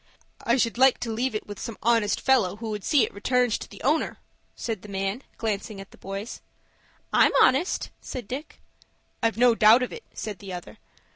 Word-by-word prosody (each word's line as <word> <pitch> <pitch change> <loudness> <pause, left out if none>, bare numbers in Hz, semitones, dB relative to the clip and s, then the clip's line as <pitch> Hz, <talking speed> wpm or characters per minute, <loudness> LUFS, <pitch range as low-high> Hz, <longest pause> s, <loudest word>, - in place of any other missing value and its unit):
"I 235 +2 +2
should 235 -1 0
like 265 -1 +6
to 230 - -2
leave 240 +2 -1
it 215 - -3
with 205 -1 -8
some 230 - -6
honest 225 -2 +2
fellow 230 -9 +3
who 220 +1 -5
would 210 -2 -4
see 290 -6 +4
it - - -2
returned 250 +4 +1
to - - -9
the 200 - -12
owner," 300 +5 +1 0.4
said 225 -5 -4
the 210 - -12
man, 195 +4 -2 0.2
glancing 215 -1 -3
at 195 - -10
the - - -16
boys. 195 +4 -6 0.7
"I'm - - +5
honest," 275 +8 +3
said 245 -5 -7
Dick. 275 +7 -7 0.6
"I've 230 -2 +1
no 245 0 +5
doubt 225 +3 +6
of 250 - -4
it," 465 - -9
said 210 -4 -6
the 195 -2 -8
other. 175 -1 -9
225 Hz, 200 wpm, -26 LUFS, 205-250 Hz, 0.7 s, like